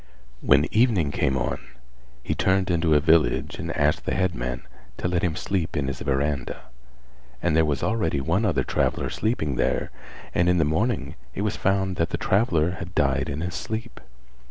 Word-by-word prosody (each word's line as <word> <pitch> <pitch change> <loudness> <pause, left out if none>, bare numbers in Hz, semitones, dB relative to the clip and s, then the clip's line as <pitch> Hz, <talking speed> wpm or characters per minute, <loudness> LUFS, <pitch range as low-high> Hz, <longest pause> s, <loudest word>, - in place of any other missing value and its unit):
When - - +4
evening 110 - +3
came 65 -1 0
on - - -1 0.6
he - - -1
turned 95 -1 +1
into 80 -2 +2
a - - +6
village 75 -1 +2
and 85 -2 -3
asked 75 +1 +1
the - - -1
headman 65 -9 -1 0.3
to - - -2
let 90 -1 0
him 85 -3 0
sleep 90 -3 -2
in 70 -2 0
his 70 - -4
verandah, 70 -1 -1 0.8
and 85 -3 +1
there 80 0 +4
was 70 -3 -1
already 85 -10 0
one 85 +10 0
other 80 - +1
traveller - - -1
sleeping 80 - -1
there - - 0 0.4
and 85 0 +3
in 90 - +3
the 80 - +3
morning 80 - 0 0.2
it - - -2
was 105 - -1
found 95 -1 0
that 85 - +1
the - - -2
traveller 90 -6 +2
had 90 +1 -8
died 70 -3 +1
in 70 +3 -3
his 90 0 -3
sleep. 110 +6 -5
80 Hz, 180 wpm, -25 LUFS, 70-95 Hz, 0.8 s, a